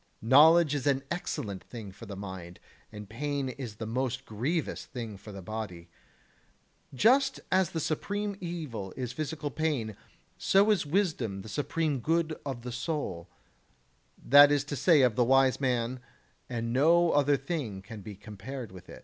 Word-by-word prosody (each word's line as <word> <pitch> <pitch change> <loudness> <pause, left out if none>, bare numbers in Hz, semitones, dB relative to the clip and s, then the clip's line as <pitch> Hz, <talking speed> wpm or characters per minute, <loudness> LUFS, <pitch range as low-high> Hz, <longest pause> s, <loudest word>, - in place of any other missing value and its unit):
Knowledge 150 +6 +6
is 145 -1 -2
an 135 -1 +2
excellent 100 - -4
thing 110 -5 -9
for 105 +4 -12
the 100 - -6
mind, 95 -3 -8 0.3
and 105 -1 -9
pain 140 +4 -2
is 125 -4 -7
the 110 - -6
most 130 +3 -2
grievous 140 +10 -2
thing 115 -5 -6
for 100 +2 -11
the 100 -2 -9
body. 90 -5 -6 1.0
Just 265 - +3
as 185 -3 +3
the 165 - -3
supreme 205 +7 -2
evil 150 - -5
is 125 -2 -3
physical 155 0 -4
pain, 135 -9 -1 0.4
so 200 +2 +4
is 190 -7 +1
wisdom 145 - 0
the 110 - -9
supreme 145 +4 -1
good 160 +4 0
of 125 -4 -5
the 125 - -5
soul, 120 - -4 0.9
that 145 +2 +7
is 145 -1 +2
to 145 0 -5
say 145 +2 +5
of 125 -4 +3
the 125 - +4
wise 135 +1 +4
man, 125 -1 0 0.5
and 115 -1 -3
no 165 +6 +4
other 145 0 +3
thing 135 - -4
can 110 0 -9
be 100 +1 -8
compared 105 +4 -8
with 90 -1 -13
it. - - -10
130 Hz, 165 wpm, -29 LUFS, 110-155 Hz, 1.0 s, that